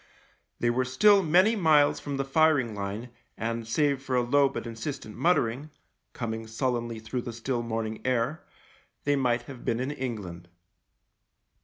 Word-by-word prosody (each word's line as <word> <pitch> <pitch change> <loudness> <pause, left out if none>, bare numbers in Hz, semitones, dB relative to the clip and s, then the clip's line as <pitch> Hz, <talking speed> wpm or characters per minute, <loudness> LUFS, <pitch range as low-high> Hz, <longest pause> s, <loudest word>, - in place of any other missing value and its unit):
They 120 - +2
were 130 +2 +1
still 195 +11 +5
many 185 +7 +4
miles 155 -7 +4
from 140 -1 -4
the 135 - -1
firing 140 -5 +3
line 105 +4 -5 0.3
and, 115 0 -3
save 140 +2 +1
for 135 -1 -2
a 125 - +3
low 140 +3 +3
but 135 - -6
insistent 115 0 -6
muttering, 145 -4 +1 0.4
coming 115 -2 -4
sullenly 120 0 -2
through 110 +3 -4
the 120 - -6
still 120 +1 -2
morning 110 -1 -3
air, 130 +4 0 0.6
they 145 0 +2
might 120 -3 +1
have 130 -4 -10
been 115 - 0
in 130 +3 -2
England. 105 -11 -5
125 Hz, 155 wpm, -28 LUFS, 115-145 Hz, 0.6 s, still